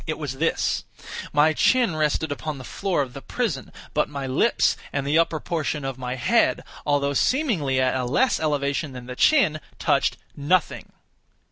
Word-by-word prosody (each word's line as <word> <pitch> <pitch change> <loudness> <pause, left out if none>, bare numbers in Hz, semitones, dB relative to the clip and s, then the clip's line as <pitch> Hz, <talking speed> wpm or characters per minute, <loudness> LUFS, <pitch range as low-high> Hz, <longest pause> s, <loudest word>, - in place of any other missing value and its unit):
It 155 - -2
was 145 -4 -5
this: 165 +1 0 0.5
my 150 +2 +4
chin 240 0 +3
rested 155 0 0
upon 150 0 -4
the 130 - -9
floor 175 +1 -1
of 125 -2 -9
the 140 - -8
prison, 195 - -3 0.2
but 150 - +1
my 140 -2 -5
lips 130 0 +2 0.2
and 140 -1 -2
the 150 +3 +3
upper 165 -1 +1
portion 155 -4 -2
of 135 -1 -4
my 125 0 -3
head, 125 - +2 0.2
although 140 -1 +1
seemingly 170 - +1
at 130 0 +2
a 130 -1 -1
less 245 - +2
elevation 140 -1 -1
than 125 -1 -8
the 125 0 -7
chin, 170 - +4 0.2
touched - - +1 0.2
nothing. 160 +5 0
145 Hz, 170 wpm, -24 LUFS, 135-160 Hz, 0.5 s, my